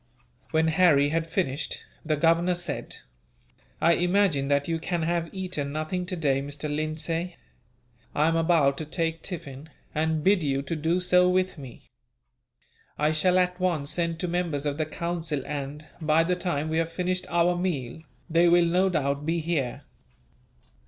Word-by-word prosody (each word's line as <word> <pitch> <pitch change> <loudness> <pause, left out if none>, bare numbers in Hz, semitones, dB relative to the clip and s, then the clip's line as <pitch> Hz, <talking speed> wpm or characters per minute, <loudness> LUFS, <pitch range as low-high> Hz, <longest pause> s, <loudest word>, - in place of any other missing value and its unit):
When 160 0 +2
Harry 155 -4 +4
had 165 +1 -1
finished, 155 -5 -2 0.2
the 155 -1 0
Governor 165 +3 +3
said: 175 0 -3 0.8
"I 170 +1 +4
imagine 175 -5 +2
that 140 0 +1
you 165 -1 -1
can 170 0 -2
have 170 0 -1
eaten 180 -7 -3
nothing 155 +4 -3
today, 150 -7 0
Mr. 145 +1 -4
Lindsay. 165 +3 -2 0.8
I 150 +2 +3
am 165 - +2
about 160 -4 +3
to 155 - -4
take 165 +1 -2
tiffin, 150 -4 -7 0.2
and 160 0 0
bid 195 +1 +4
you 140 -2 0
do 165 +3 -1
so 180 0 +4
with 185 -2 0
me. 130 -4 -11 1.1
I 150 +1 +2
shall 180 +4 +2
at 180 0 +1
once 165 -6 0
send 170 -1 -1
to 180 - -1
members 170 -5 -1
of 145 +1 -2
the 155 - 0
Council 165 -3 -3
and, 145 +1 -5 0.2
by 155 +1 +3
the 180 +2 +1
time 170 -4 -2
we 160 +1 +1
have 165 0 -1
finished 180 +1 -2
our 175 +1 +2
meal, 160 -6 -3 0.3
they 170 +1 +4
will 175 0 +5
no 180 +3 +2
doubt 140 -4 -1
be 165 +1 +1
here." 155 -6 -2
165 Hz, 160 wpm, -26 LUFS, 150-175 Hz, 1.1 s, will